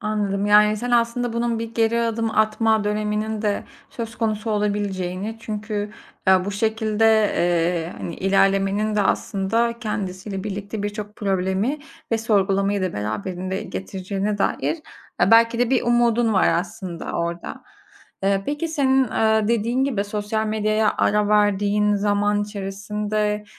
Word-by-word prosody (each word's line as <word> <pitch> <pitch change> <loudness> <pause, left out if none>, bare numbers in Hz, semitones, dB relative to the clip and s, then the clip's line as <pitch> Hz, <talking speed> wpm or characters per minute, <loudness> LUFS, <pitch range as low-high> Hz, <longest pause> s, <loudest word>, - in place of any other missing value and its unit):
Anladım. 205 -2 -1
Yani, 210 +1 +5
sen 245 +3 -4
aslında 240 0 +1
bunun 235 0 -1
bir 230 0 -6
geri 230 0 +2
adım 230 -1 -1
atma 215 0 +2
döneminin 210 +1 -1
de 205 -1 -1 0.3
söz 225 -1 -6
konusu 220 0 -1
olabileceğini 205 -1 -2
çünkü 210 -1 -4 0.4
ya 190 -1 +5
bu 200 - -3
şekilde, 220 +1 0 0.9
ııı, - - -12
hani, 170 - -5
ilerlemenin 195 +2 +1
de 205 - +3
aslında 225 +5 0
kendisiyle 195 -3 -4
birlikte 205 +1 -5
birçok 210 0 -5
problemi 195 +7 0 0.3
ve 225 - +2
sorgulamayı 200 -2 +1
da 185 - -1
beraberinde 175 - -3
getireceğine 195 +2 -4
dair 205 - 0 0.5
e, 185 - +4
belki 230 +1 +5
de 245 0 +1
bir 260 - +2
umudun 240 -1 +2
var 190 - +4
aslında 180 0 -3
orada. 170 0 -4 0.6
Iıı, 195 0 +2
peki, 295 +3 -2
senin, 270 -4 +2
ııı, 220 -2 +1
dediğin 235 +3 +1
gibi, 220 -8 -1
sosyal 210 +1 -2
medyaya 215 0 +1
ara 210 0 +2
verdiğin 210 0 +2
zaman 205 0 +1
içerisinde, 210 +1 -3
210 Hz, 135 wpm, -22 LUFS, 200-225 Hz, 0.9 s, Yani